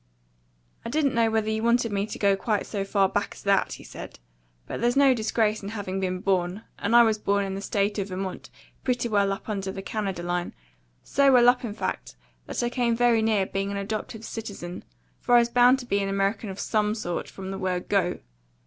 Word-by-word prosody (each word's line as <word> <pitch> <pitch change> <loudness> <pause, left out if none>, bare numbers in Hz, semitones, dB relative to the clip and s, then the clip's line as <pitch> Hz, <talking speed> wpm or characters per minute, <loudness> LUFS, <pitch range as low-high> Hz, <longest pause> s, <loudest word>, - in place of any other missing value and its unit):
"I - - -5
didn't 290 0 +1
know 230 -1 +3
whether 220 -1 0
you 220 0 -1
wanted 235 0 +2
me 200 +1 -1
to - - -6
go 200 -1 +3
quite 210 +1 -1
so 200 -2 -3
far 195 0 +2
back 205 +1 -2
as - - -13
that," 200 -1 +2
he - - -10
said. - - -9 0.5
"But - - -5
there's 240 +1 +2
no 275 -2 +6
disgrace 220 -2 0
in 200 - -6
having 200 -3 -4
been 185 -1 -2
born, 190 +1 0 0.2
and 215 +3 +1
I 240 - +9
was 220 -2 +2
born 200 -1 +1
in 195 - -4
the 195 - -4
State 205 +1 0
of 195 - -2
Vermont, 190 0 -5 0.3
pretty 250 -2 0
well 200 -3 +2
up 195 - -5
under 195 -3 -3
the 195 0 -7
Canada 195 -4 -3
line 175 0 -2 0.5
so 280 0 +3
well 245 -2 +6
up, 250 +1 +4
in 215 -4 -4
fact, - - -4 0.3
that - - -2
I 240 - +1
came 240 -2 +1
very 235 -1 +3
near 215 -3 +2
being 195 +1 -3
an 200 - -3
adoptive 215 +2 -4
citizen; 200 -6 -7 0.4
for 245 - +3
I - - +9
was 235 0 +4
bound 245 +2 +5
to 260 - -8
be 200 -4 0
an 195 0 -1
American 195 +2 0
of 190 +1 -7
SOME 210 -1 0
sort, 175 -6 -4
from 190 0 -7
the 195 - -5
word 185 -2 -2
Go! 190 -3 0
205 Hz, 225 wpm, -26 LUFS, 195-230 Hz, 0.5 s, I